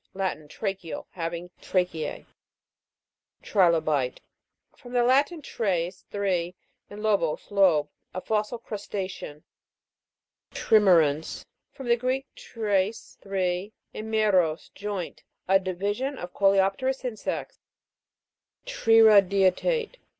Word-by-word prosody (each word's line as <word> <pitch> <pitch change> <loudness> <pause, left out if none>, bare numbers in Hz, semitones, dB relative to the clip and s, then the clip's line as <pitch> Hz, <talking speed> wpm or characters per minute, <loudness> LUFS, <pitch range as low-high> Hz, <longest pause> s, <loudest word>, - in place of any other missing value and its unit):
Latin. 185 -6 -3
Tracheal; 195 -1 -5
having 170 0 -5
tracheae. 175 -5 -2 1.2
TRI'LOBITE. 160 - +2 0.6
From 245 0 -13
the 245 -1 +3
Latin, 280 +6 +2
Ires, 185 -7 -2
three, 185 -3 -1 0.3
and 210 +1 -9
lobus, 200 -8 0
lobe. 180 -7 +4 0.2
A 185 - -4
fossil 215 +4 -1
crusta'cean. 195 -8 -6 1.1
TRIME'RANS. 165 -8 +3 0.3
From 265 -3 -9
the 235 0 +4
Greek, 255 +2 -1
treis, 210 -1 -2
three, 190 +1 -2 0.2
and 220 +1 -6
meros, 185 -7 +1
joint. 200 -4 -5 0.3
A 195 +1 +5
division 205 +9 -2
of 175 0 -7
coleopterous 200 +7 +2
insects. 235 -4 -4 1.1
TRIRA'DIATE. 225 - +4
195 Hz, 90 wpm, -26 LUFS, 180-220 Hz, 1.2 s, A